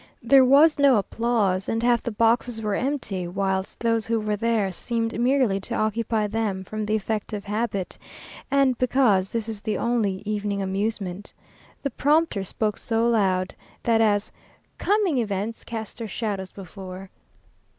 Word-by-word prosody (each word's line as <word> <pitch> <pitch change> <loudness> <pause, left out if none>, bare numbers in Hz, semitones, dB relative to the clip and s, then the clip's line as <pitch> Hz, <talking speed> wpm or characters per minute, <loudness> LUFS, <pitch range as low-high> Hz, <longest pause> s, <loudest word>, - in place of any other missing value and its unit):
There 265 +3 +6
was 285 +4 +5
no 280 -2 +6
applause, 205 -3 0
and 225 +1 -1
half 240 -1 +3
the - - -3
boxes 230 +1 +1
were 210 -2 -2
empty, 215 -8 -2
whilst 190 +1 -2
those 230 -1 +1
who 230 0 +1
were 210 -1 -1
there 220 -2 0
seemed 230 +4 -2
merely 245 -5 +2
to 195 - -5
occupy 220 0 0
them 210 -3 -2
from 215 +2 -4
the 215 - +1
effect 215 +1 -3
of 205 -1 -4
habit, 205 -2 -3 0.5
and 275 -2 +3
because 240 -7 +3
this 230 -1 -2
is 220 -2 -5
the 215 -1 -2
only 220 -6 0
evening 205 -1 -2
amusement. 195 0 -3 0.5
The 280 - -1
prompter 300 -8 +2
spoke 210 +2 -2
so 230 0 0
loud, 190 -5 +1 0.3
that 230 -1 +3
as 205 -2 +2 0.5
"Coming 395 -9 +2
events 210 0 -3
cast 225 -1 -6
their 230 - -4
shadows 200 -2 -3
before." 190 0 -9
220 Hz, 155 wpm, -24 LUFS, 200-235 Hz, 0.5 s, There